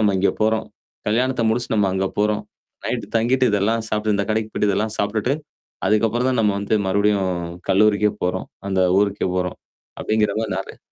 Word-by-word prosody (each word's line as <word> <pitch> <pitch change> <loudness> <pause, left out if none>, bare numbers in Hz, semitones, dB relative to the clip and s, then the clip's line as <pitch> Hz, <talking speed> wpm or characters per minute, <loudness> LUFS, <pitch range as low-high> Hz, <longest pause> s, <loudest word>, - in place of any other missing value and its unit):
நம்ம 105 -3 +3
இங்க 100 - +3
போறோம். 110 0 +1 0.4
கல்யாணத்த 125 +2 +1
முடிச்சுட்டு 115 0 0
நம்ம 100 -2 +3
அங்க 95 0 0
போறோம். 105 0 +1 0.4
நைட் - - -2
தங்கிட்டு, 125 +3 +2
இதெல்லாம் 110 +3 +1
சாப்ட்டு 105 -1 0
இந்த 100 - 0
கடைக்கு 110 0 -1
போய்டு 105 - +1
இதெல்லாம் 110 +2 -1
சாப்ட்டுட்டு, 110 +6 0 0.5
அதுக்கப்புறம் 115 +4 +2
தான் 125 -2 +1
நம்ம 105 -2 +2
வந்து 100 +2 0
மறுபடியும் 100 -1 +2 0.4
கல்லூரிக்கே 105 +1 +4
போறோம். 90 - -1 0.2
அந்த 95 -1 +1 0.2
ஊருக்கே 100 -1 +1
போறோம், 90 -1 -2 0.4
அப்படிங்கிற 105 -2 +1
மாரி 110 -4 -2
நெறைய 95 - -6
105 Hz, 165 wpm, -21 LUFS, 100-110 Hz, 0.5 s, கல்லூரிக்கே